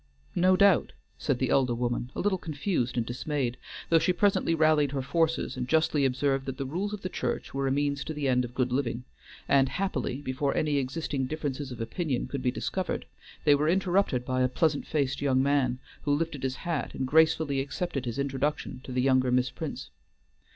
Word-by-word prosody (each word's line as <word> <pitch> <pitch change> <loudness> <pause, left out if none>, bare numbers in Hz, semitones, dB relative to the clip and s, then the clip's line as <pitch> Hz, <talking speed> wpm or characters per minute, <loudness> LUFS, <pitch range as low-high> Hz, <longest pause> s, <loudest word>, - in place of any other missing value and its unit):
"No 185 +1 +4
doubt," 200 -3 +4 0.3
said 140 -4 0
the 130 0 0
elder 130 -3 +3
woman, 120 0 -2
a - - -2
little 195 -2 +1
confused 145 - -2
and 115 - +1
dismayed, 125 0 -2 0.3
though 165 - +6
she 165 +3 +2
presently 180 -2 +2
rallied 155 -3 +3
her 135 -2 -1
forces 165 +4 0
and 125 -1 -3
justly 155 -2 +3
observed 135 +1 0
that 130 -1 -4
the 135 - -3
rules 180 +9 -2
of 210 -1 -6
the - - -1
church 125 -9 -3
were 135 0 0
a - - +1
means 140 0 0
to 155 - -4
the 145 -2 -1
end 125 -1 +3
of 120 0 -7
good 125 -1 0
living, 125 -2 -1 0.4
and 135 -1 +4
happily, 140 -9 -2
before 140 0 -1
any 150 -2 +1
existing 135 0 -2
differences 145 -2 -4
of 125 - -7
opinion 125 +4 -2
could 140 - -4
be 125 - +1
discovered, 185 +8 -3 0.4
they 145 - +7
were 150 +2 +2
interrupted 180 -8 +1
by 130 0 0
a 125 - +4
pleasant 145 +3 0
faced 140 -4 -1
young 130 -2 +3
man, 135 -3 +2 0.2
who 145 -1 +1
lifted 150 -3 -2
his 130 -1 -1
hat 170 -4 -2
and 130 - -1
gracefully 160 0 +3
accepted 140 0 -3
his 120 0 -3
introduction 140 -1 -2
to 130 - -8
the 125 0 0
younger 130 -1 +3
Miss 125 0 +2
Prince. - - -6
140 Hz, 200 wpm, -28 LUFS, 130-160 Hz, 0.4 s, they